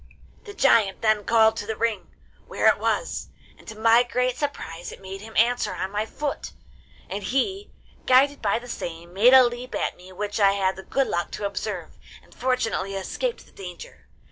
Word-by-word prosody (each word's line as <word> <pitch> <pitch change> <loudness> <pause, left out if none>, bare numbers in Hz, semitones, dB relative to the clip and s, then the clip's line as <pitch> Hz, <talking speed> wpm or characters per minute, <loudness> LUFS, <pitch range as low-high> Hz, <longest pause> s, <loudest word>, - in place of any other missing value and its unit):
'The 410 - -9
giant 220 -8 +3
then 215 -1 +3
called 220 0 +4
to 205 - -5
the 220 - -2
ring, 230 0 -2 0.4
where - - -2
it - - +5
was, - - -1 0.3
and - - -20
to 220 - -8
my 225 +2 +5
great 250 0 0
surprise 175 - -5
it - - -11
made 195 0 -8
him 220 +1 -9
answer 230 -4 +2
on 190 - -3
my 210 +2 -2
foot; 290 +4 -4 0.5
and 200 - -4
he, 325 - -1 0.4
guided 275 +2 +4
by - - +1
the 240 +1 -9
same, 170 -6 -6
made 220 +6 +6
a 260 - +9
leap 245 +1 -3
at - - -1
me 180 +1 -14
which 205 +3 -4
I 195 -1 +5
had 190 -1 0
the 190 - -8
good 270 +7 0
luck 175 -6 -2
to 205 - -4
observe, 200 - -5 0.2
and - - -21
fortunately 235 -6 -1
escaped 460 - -3
the - - -22
danger. 180 -3 -11
220 Hz, 195 wpm, -24 LUFS, 195-250 Hz, 0.5 s, a